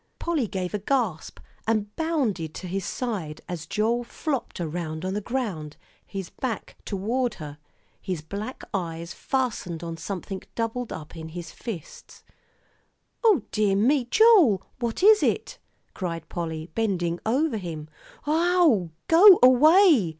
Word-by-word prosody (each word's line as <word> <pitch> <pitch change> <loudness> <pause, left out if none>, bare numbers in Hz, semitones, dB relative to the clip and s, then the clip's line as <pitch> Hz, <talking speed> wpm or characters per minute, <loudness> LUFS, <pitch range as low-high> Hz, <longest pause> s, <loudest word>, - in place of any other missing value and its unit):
Polly 315 -9 -1
gave 185 -1 -4
a 210 - -1
gasp, 210 - -1 0.3
and 210 -2 0
bounded 250 - -1
to - - -7
his 190 +2 -3
side, 195 -12 -4
as 165 -3 -6
Joel 230 +6 0
flopped 270 - -4
around 160 0 -4
on 190 - -2
the 210 - -2
ground, 195 - -4 0.3
his 195 -3 -7
back 245 -6 -4
toward 225 +4 -1
her, 150 -1 -9 0.4
his 180 -5 -4
black 205 +9 -6
eyes 170 -2 -4
fastened 215 - -2
on 165 -1 -5
something 190 +2 -5
doubled 230 +1 -2
up 155 +1 -8
in 160 -1 -7
his 170 0 -7
fists. 185 -9 -9 1.0
"O 430 -9 +4
dear 210 -2 +2
me, 250 +6 +3
Joel, 340 - +5 0.2
what 235 +7 -2
is 430 +1 +7
it?" - - -1 0.3
cried 165 -4 -4
Polly, 160 -1 -5
bending 175 -6 -1
over 260 +3 +1
him. 165 -6 -6 0.4
"Ow 320 - +3 0.2
go 360 +3 +9
way!" 295 - +6
210 Hz, 135 wpm, -25 LUFS, 170-260 Hz, 1.0 s, go